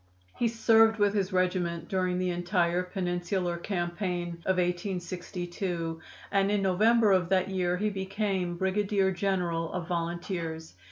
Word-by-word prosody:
He 240 Hz, -, +1 dB
served 225 Hz, -1 st, +4 dB
with 205 Hz, -1 st, +3 dB
his 200 Hz, -2 st, 0 dB
regiment 180 Hz, -2 st, 0 dB
during 185 Hz, -1 st, 0 dB
the 180 Hz, 0 st, 0 dB
entire 175 Hz, 0 st, +1 dB
Peninsular 180 Hz, -1 st, -2 dB
campaign 175 Hz, -1 st, -3 dB
of 190 Hz, -1 st, +2 dB
1862, 175 Hz, -1 st, -3 dB, 0.3 s
and 195 Hz, 0 st, +3 dB
in 205 Hz, -1 st, +1 dB
November 215 Hz, +4 st, +4 dB
of 185 Hz, -2 st, +3 dB
that 185 Hz, 0 st, +2 dB
year 180 Hz, -1 st, 0 dB
he 210 Hz, +2 st, 0 dB
became 190 Hz, -2 st, -2 dB
brigadier 195 Hz, +1 st, +1 dB
general 175 Hz, -3 st, -1 dB
of 175 Hz, -2 st, -4 dB
volunteers. 170 Hz, -1 st, -3 dB
185 Hz, 130 wpm, -29 LUFS, 175-195 Hz, 0.3 s, served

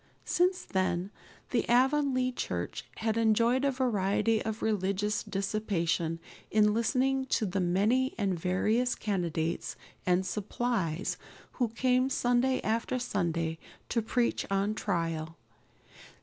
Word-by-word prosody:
Since 360 Hz, +1 st, +2 dB
then 185 Hz, 0 st, -1 dB, 0.4 s
the 240 Hz, -, 0 dB
Avonlea 255 Hz, 0 st, +3 dB
church -, -, -4 dB
had 220 Hz, 0 st, 0 dB
enjoyed 230 Hz, +3 st, +3 dB
a 280 Hz, -, +3 dB
variety 225 Hz, -4 st, +1 dB
of 220 Hz, 0 st, -4 dB
religious 210 Hz, 0 st, 0 dB
dissipation 180 Hz, -5 st, -1 dB, 0.3 s
in 210 Hz, -1 st, +4 dB
listening 265 Hz, +3 st, +1 dB
to 225 Hz, -, +1 dB
the 195 Hz, 0 st, -1 dB
many 205 Hz, +9 st, +2 dB
and 200 Hz, -4 st, +1 dB
various 215 Hz, +8 st, +1 dB
candidates 170 Hz, -5 st, -2 dB, 0.3 s
and 185 Hz, +1 st, +2 dB
"supplies" 200 Hz, -4 st, -1 dB, 0.3 s
who 245 Hz, -, 0 dB
came 255 Hz, +3 st, +1 dB
Sunday 250 Hz, 0 st, +2 dB
after 230 Hz, +3 st, 0 dB
Sunday 170 Hz, -8 st, -1 dB, 0.3 s
to 230 Hz, -, +1 dB
preach 235 Hz, +2 st, 0 dB
on 195 Hz, +2 st, +1 dB
trial. 165 Hz, -6 st, -2 dB
215 Hz, 115 wpm, -30 LUFS, 185-245 Hz, 0.4 s, in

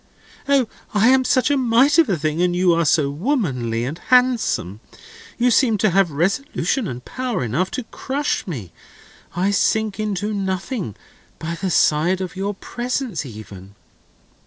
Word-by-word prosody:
"O, 275 Hz, -4 st, +3 dB, 0.3 s
I 215 Hz, +4 st, +5 dB
am 260 Hz, 0 st, +5 dB
such 255 Hz, +2 st, +2 dB
a 285 Hz, -, +3 dB
mite 260 Hz, +5 st, +4 dB
of 325 Hz, -, +4 dB
a 190 Hz, -, +1 dB
thing, 155 Hz, +2 st, -1 dB
and 180 Hz, 0 st, +1 dB
you 180 Hz, -1 st, +3 dB
are 165 Hz, 0 st, +1 dB
so 145 Hz, -2 st, +2 dB
womanly 140 Hz, -, -1 dB
and 150 Hz, +7 st, -5 dB
handsome. 245 Hz, -, +2 dB, 0.6 s
You 245 Hz, +1 st, +3 dB
seem 230 Hz, -2 st, +3 dB
to 205 Hz, 0 st, +2 dB
have 195 Hz, 0 st, +3 dB
resolution 200 Hz, -, -1 dB
and 125 Hz, -3 st, -7 dB
power 255 Hz, -, -3 dB
enough 140 Hz, +11 st, -1 dB
to 255 Hz, -, -3 dB
crush 275 Hz, +3 st, -3 dB
me. 120 Hz, -, -6 dB, 0.6 s
I 185 Hz, +3 st, +1 dB
shrink 215 Hz, 0 st, +1 dB
into 210 Hz, 0 st, -2 dB
nothing 190 Hz, -, -3 dB, 0.4 s
by 165 Hz, +1 st, -4 dB
the 185 Hz, +3 st, -3 dB
side 170 Hz, +3 st, +2 dB
of 185 Hz, -2 st, -5 dB
your 200 Hz, +2 st, -3 dB
presence 240 Hz, -, -4 dB
even." 100 Hz, -3 st, -11 dB
195 Hz, 160 wpm, -21 LUFS, 155-245 Hz, 0.6 s, I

